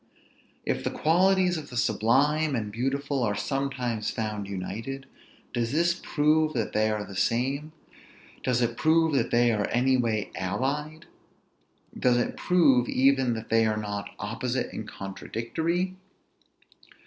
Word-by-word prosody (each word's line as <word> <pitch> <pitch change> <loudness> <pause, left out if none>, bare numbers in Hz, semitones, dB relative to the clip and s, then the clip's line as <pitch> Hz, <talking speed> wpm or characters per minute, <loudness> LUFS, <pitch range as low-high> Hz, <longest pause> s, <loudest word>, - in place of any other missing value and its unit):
If - - -1
the - - 0
qualities 180 +2 +3
of 145 - -10
the 125 - -6
sublime 140 +6 +2
and 105 -3 -3
beautiful 135 +4 -1
are 105 -4 +1
sometimes 125 0 -2
found 105 -3 -3
united, 110 +8 -5 0.5
does 115 -1 -1
this 170 +2 +3
prove 155 -1 +1
that 115 -4 -2
they 110 +1 +2
are 105 -1 -2
the 100 - -10
same; 135 +9 0 0.7
does 125 -1 +1
it 120 0 -1
prove 160 0 +3
that 130 -4 +1
they 120 0 +4
are 105 -2 0
any 130 +2 +2
way 110 -4 -1
allied; 145 - -2 0.9
does 125 -1 +3
it 120 - -1
prove 140 -9 +3
even 135 -2 +3
that 110 0 -7
they 115 0 +4
are 110 0 0
not 105 -1 -4
opposite 120 +4 -3
and - - -6
contradictory? 160 - -3
125 Hz, 140 wpm, -27 LUFS, 110-150 Hz, 0.9 s, they